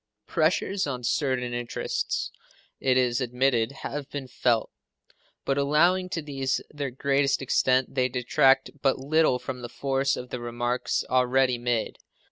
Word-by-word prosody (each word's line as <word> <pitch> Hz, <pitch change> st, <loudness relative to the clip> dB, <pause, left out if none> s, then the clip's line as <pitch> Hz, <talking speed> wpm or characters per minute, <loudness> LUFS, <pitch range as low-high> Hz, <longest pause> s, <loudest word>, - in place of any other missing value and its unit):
Pressures 175 Hz, +3 st, +1 dB
on 125 Hz, -3 st, -4 dB
certain 125 Hz, -1 st, 0 dB
interests, 120 Hz, 0 st, -2 dB, 0.5 s
it 130 Hz, -1 st, +2 dB
is 125 Hz, 0 st, +2 dB
admitted, 125 Hz, -1 st, +1 dB
have 145 Hz, -1 st, -5 dB
been 140 Hz, -2 st, -5 dB
felt; 120 Hz, -2 st, 0 dB, 0.7 s
but 135 Hz, 0 st, +1 dB
allowing 175 Hz, +6 st, +3 dB
to 165 Hz, -3 st, -3 dB
these 135 Hz, -3 st, -1 dB
their 145 Hz, -2 st, -3 dB
greatest 140 Hz, +2 st, +1 dB
extent, 130 Hz, -1 st, +1 dB
they 130 Hz, -1 st, +1 dB
detract 130 Hz, +2 st, +3 dB
but 135 Hz, -1 st, +2 dB
little 145 Hz, 0 st, +2 dB
from 125 Hz, 0 st, -6 dB
the 120 Hz, -, -6 dB
force 135 Hz, +1 st, 0 dB
of 125 Hz, 0 st, -8 dB
the 125 Hz, -, -3 dB
remarks 120 Hz, +1 st, -1 dB
already 125 Hz, 0 st, +2 dB
made. 120 Hz, -2 st, -1 dB
130 Hz, 140 wpm, -26 LUFS, 125-140 Hz, 0.7 s, allowing